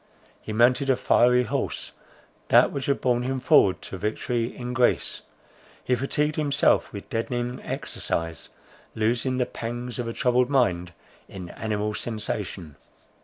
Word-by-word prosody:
He - - -7
mounted 125 +5 +3
a 130 - +5
fiery 125 +1 +4
horse, - - -3 0.6
that - - +5
which 140 - -4
had 140 - +1
borne 120 -1 +2
him 130 +1 -2
forward 125 - +4
to 95 - -7
victory 115 +3 -1
in 125 +1 -6
Greece; 125 -1 +1 0.6
he 130 - 0
fatigued 145 +4 0
himself 145 -2 +2
with - - -8
deadening 120 +2 -2
exercise, 80 -2 -4 0.5
losing 120 +4 0
the 125 - +1
pangs 120 +1 -5
of 120 - -2
a 115 - -3
troubled 125 +1 +2
mind 90 -11 +1 0.4
in 90 -3 -8
animal 105 0 -2
sensation. 105 -7 -4
120 Hz, 140 wpm, -25 LUFS, 110-125 Hz, 0.6 s, a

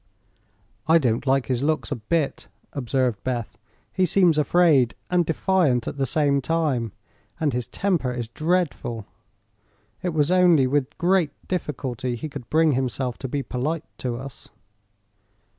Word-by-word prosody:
"I 165 +1 +6
don't 125 -3 0
like 135 -1 +3
his 125 -2 -1
looks 145 -5 0
a - - 0
bit," 140 +6 -2 0.3
observed 125 -4 -1
Beth. 120 -3 -3 0.3
"He 185 -1 +2
seems 175 -3 +4
afraid 150 -6 +4 0.2
and 175 -2 +2
defiant 160 -8 +2
at - - -4
the 135 -1 0
same 140 0 +2
time, 140 -7 0 0.5
and 150 -4 +1
his 125 -1 -2
temper 175 -10 0
is 120 -2 -4
dreadful. 155 - -1 1.0
It 180 - -1
was 150 +2 +2
only 175 -6 +5
with 140 +1 -1
great 175 -3 +2
difficulty 130 -8 -3
he 135 +7 -5
could 135 -4 -9
bring 160 0 +4
himself 130 -1 -2
to 135 - -4
be 140 +2 -2
polite 135 +7 -3
to 125 -2 -2
us." 135 0 -9
140 Hz, 145 wpm, -24 LUFS, 125-165 Hz, 1.0 s, I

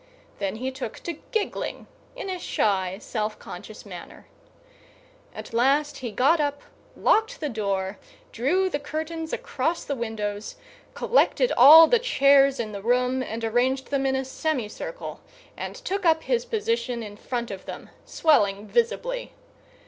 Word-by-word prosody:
Then 200 0 -2
he 260 +4 -3
took 260 -4 -6
to 340 -3 -5
giggling 440 -4 -2 0.3
in - - -6
a 370 -1 -3
shy, 190 - 0
self 215 -1 -3
conscious - - -10
manner. - - -10 1.1
At - - -9
last 280 +4 +2
he 245 -3 -5
got 270 +10 +3
up, 285 -1 -1 0.3
locked 445 +3 +2
the 300 - -2
door, 200 -4 -2 0.3
drew 345 +11 +1
the 295 -6 -2
curtains 315 +2 -4
across 335 +1 -2
the 285 - -2
windows, 215 -4 -4 0.4
collected - - +2
all 305 +6 +10
the 470 +8 +3
chairs 275 - +4
in 220 -2 -3
the 200 -1 -6
room 250 +3 +1
and 230 -2 -5
arranged 250 +4 0
them 275 -1 +1
in 265 - +1
a 265 0 -1
semicircle, 310 - -4 0.3
and - - -6
took 400 -5 -3
up 320 -2 +3
his 485 -1 0
position 440 - -1
in 205 -1 -8
front 235 +2 -4
of 195 - -8
them, - - -8
swelling 210 - +2
visibly. 485 - -1
270 Hz, 150 wpm, -25 LUFS, 225-335 Hz, 1.1 s, all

